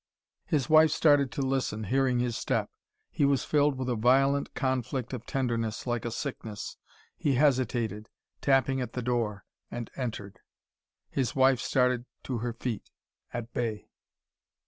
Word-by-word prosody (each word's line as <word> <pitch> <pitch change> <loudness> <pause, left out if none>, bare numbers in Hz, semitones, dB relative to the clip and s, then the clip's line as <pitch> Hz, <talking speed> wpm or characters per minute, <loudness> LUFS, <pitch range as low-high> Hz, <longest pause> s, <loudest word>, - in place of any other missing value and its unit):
His 145 -7 +1
wife 155 0 +7
started 145 -5 +4
to 140 - -1
listen, 130 -5 -1
hearing 130 +3 +2
his 120 -1 0
step. - - -1 0.4
He - - 0
was 140 -1 +3
filled 145 -2 +2
with 130 -1 -3
a 125 - +1
violent 135 +5 +3
conflict 130 -1 -1
of 120 -2 -6
tenderness, 115 -5 -1
like 120 -2 -1
a - - 0
sickness. 110 -4 -5 0.4
He 140 -3 +1
hesitated, 120 -6 +1 0.3
tapping 135 -1 +3
at 125 - -4
the 125 - -3
door, 115 -5 -1 0.2
and 120 -1 -6
entered. 110 -6 -5 0.7
His 130 -5 -1
wife 130 -1 +5
started 125 -2 +1 0.2
to 125 -3 -3
her 120 +1 -2
feet, 115 -2 -4 0.4
at 120 -1 -5
bay. 110 -3 -3
125 Hz, 145 wpm, -29 LUFS, 115-135 Hz, 0.7 s, wife